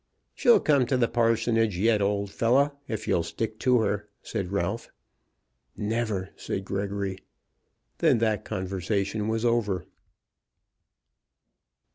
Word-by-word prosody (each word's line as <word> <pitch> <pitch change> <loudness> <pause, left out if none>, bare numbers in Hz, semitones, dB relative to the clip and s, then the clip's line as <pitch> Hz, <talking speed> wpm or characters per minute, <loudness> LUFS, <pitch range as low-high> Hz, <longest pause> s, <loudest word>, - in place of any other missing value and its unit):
"She'll 240 -3 +5
come 140 -5 +3
to 130 - +1
the 120 -2 +3
parsonage 115 -3 +2
yet, 105 +2 +3
old 100 0 0
fellow, 130 +6 +3 0.2
if 110 -1 -4
you'll 85 - +2
stick 110 +7 -4
to 125 -1 +3
her," 105 -1 -1
said 90 - -4
Ralph. 100 +3 -2 0.9
"Never," 105 -3 -2
said 95 - -4
Gregory. 100 -1 -3 0.8
Then - - +4
that 110 -2 +1
conversation 100 +3 -2
was 110 +1 0
over. 105 -7 +1
110 Hz, 115 wpm, -27 LUFS, 100-115 Hz, 0.9 s, She'll